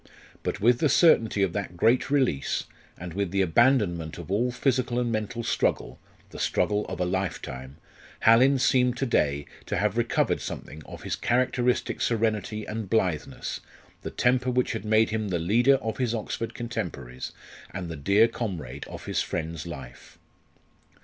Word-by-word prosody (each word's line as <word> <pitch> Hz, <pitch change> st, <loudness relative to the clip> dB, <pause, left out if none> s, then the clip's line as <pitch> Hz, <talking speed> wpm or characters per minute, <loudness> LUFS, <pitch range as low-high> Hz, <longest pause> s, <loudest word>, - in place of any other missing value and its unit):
But -, -, -3 dB
with 120 Hz, +3 st, +4 dB
the 155 Hz, -, +3 dB
certainty 115 Hz, -, +4 dB
of 90 Hz, -3 st, 0 dB
that 100 Hz, -4 st, -4 dB
great 115 Hz, +9 st, +3 dB
release, 130 Hz, -, +1 dB, 0.3 s
and 90 Hz, -1 st, -7 dB
with 100 Hz, 0 st, -1 dB
the 95 Hz, +2 st, +1 dB
abandonment 95 Hz, -, +2 dB
of 85 Hz, +1 st, -8 dB
all 115 Hz, +5 st, +2 dB
physical 125 Hz, -1 st, 0 dB
and 120 Hz, -1 st, 0 dB
mental 110 Hz, +1 st, -2 dB
struggle -, -, -1 dB, 0.3 s
the -, -, -9 dB
struggle 105 Hz, 0 st, 0 dB
of 95 Hz, -, -6 dB
a 90 Hz, -, +1 dB
lifetime 75 Hz, -8 st, -4 dB, 0.4 s
Hallin 130 Hz, +5 st, +6 dB
seemed 125 Hz, -1 st, +3 dB
to 135 Hz, -, 0 dB
day 70 Hz, -, +1 dB, 0.2 s
to -, -, -1 dB
have -, -, +1 dB
recovered -, -, +1 dB
something 80 Hz, -, -7 dB
of -, -, -10 dB
his -, -, -2 dB
characteristic 125 Hz, 0 st, 0 dB
serenity 110 Hz, -2 st, 0 dB
and 110 Hz, -2 st, -5 dB
blitheness 90 Hz, -8 st, -1 dB, 0.4 s
the -, -, -5 dB
temper 125 Hz, +1 st, +1 dB
which 125 Hz, 0 st, +1 dB
had 110 Hz, -2 st, -4 dB
made 110 Hz, +1 st, +3 dB
him 110 Hz, -1 st, -1 dB
the 90 Hz, -, 0 dB
leader 115 Hz, +11 st, +4 dB
of 110 Hz, -4 st, -3 dB
his 120 Hz, -2 st, 0 dB
Oxford 115 Hz, +1 st, -4 dB
contemporaries, 65 Hz, -, -5 dB, 0.4 s
and 90 Hz, -2 st, -5 dB
the 80 Hz, -, -5 dB
dear 100 Hz, +10 st, +4 dB
comrade 100 Hz, -10 st, -5 dB
of -, -, -9 dB
his -, -, 0 dB
friend's 80 Hz, 0 st, -4 dB
life. 70 Hz, -7 st, -10 dB
110 Hz, 165 wpm, -26 LUFS, 90-120 Hz, 0.4 s, Hallin